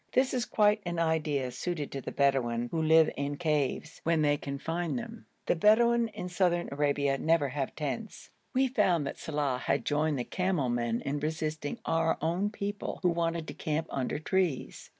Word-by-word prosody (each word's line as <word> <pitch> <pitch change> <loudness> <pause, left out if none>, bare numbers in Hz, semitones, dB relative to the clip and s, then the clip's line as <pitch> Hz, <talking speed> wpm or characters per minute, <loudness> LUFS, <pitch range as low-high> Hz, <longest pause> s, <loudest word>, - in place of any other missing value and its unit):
This 260 +1 +3
is 245 -2 0
quite 210 0 +3
an 175 -1 -3
idea 155 -5 0
suited 150 +3 -3
to 135 - -4
the - - -6
Bedouin, 120 -4 +1
who 165 - 0
live 160 0 +5
in 140 0 -3
caves, 150 -1 -1
when 165 -1 +2
they 145 -1 +4
can 140 -1 -5
find 165 - -2
them. 235 -1 -8 0.2
The - - +2
Bedouin 230 +5 +4
in 210 -4 -6
Southern 175 -1 +1
Arabia 140 -1 +1
never 160 -3 +2
have 135 0 -3
tents. 160 +9 -5 0.2
We 265 0 +3
found 190 - +2
that 140 - -5
Saleh 145 -5 -1
had - - 0
joined 150 0 +1
the 125 - -1
camel 180 -4 0
men 120 -1 0
in 145 +1 -2
resisting 155 +2 -3
our 165 0 +1
own 175 +6 0
people, 205 -1 -4
who 180 - +4
wanted 165 -1 -1
to - - -5
encamp 155 +1 -2
under 135 0 -1
trees. 155 - -1
160 Hz, 185 wpm, -30 LUFS, 140-180 Hz, 0.2 s, live